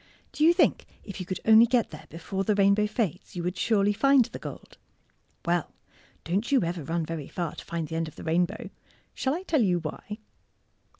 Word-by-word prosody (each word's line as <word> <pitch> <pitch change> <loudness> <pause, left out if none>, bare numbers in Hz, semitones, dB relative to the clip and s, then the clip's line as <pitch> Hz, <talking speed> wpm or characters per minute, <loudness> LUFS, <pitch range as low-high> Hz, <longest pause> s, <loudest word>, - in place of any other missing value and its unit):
Do 300 - -1
you 330 - +7
think 345 - +2 0.2
if 200 -2 -8
you 185 - -6
could 185 - -4
only 225 +1 +7
get 240 -1 +1
there 155 - -11
before 190 +4 -4
the 210 +2 +1
rainbow 200 +1 +4
fades 210 -3 -3
you 175 - -3
would 180 +2 -2
surely 205 -2 +2
find 275 +2 +4
the - - -9
gold? - - -10 0.7
Well, 175 -1 0 0.5
don't 195 - -1
you 270 -7 +4
ever 170 -1 -3
run 165 +3 -2
very 155 -3 -5
far 170 -4 -4
to - - -9
find 165 -2 -3
the 160 - -4
end 165 0 -1
of 155 - -11
the - - -10
rainbow. 175 +6 -1 0.4
Shall 265 +2 -1
I 360 - -5
tell 315 -7 +1
you 185 -5 +2
why? 175 +6 -6
195 Hz, 205 wpm, -27 LUFS, 170-220 Hz, 0.7 s, you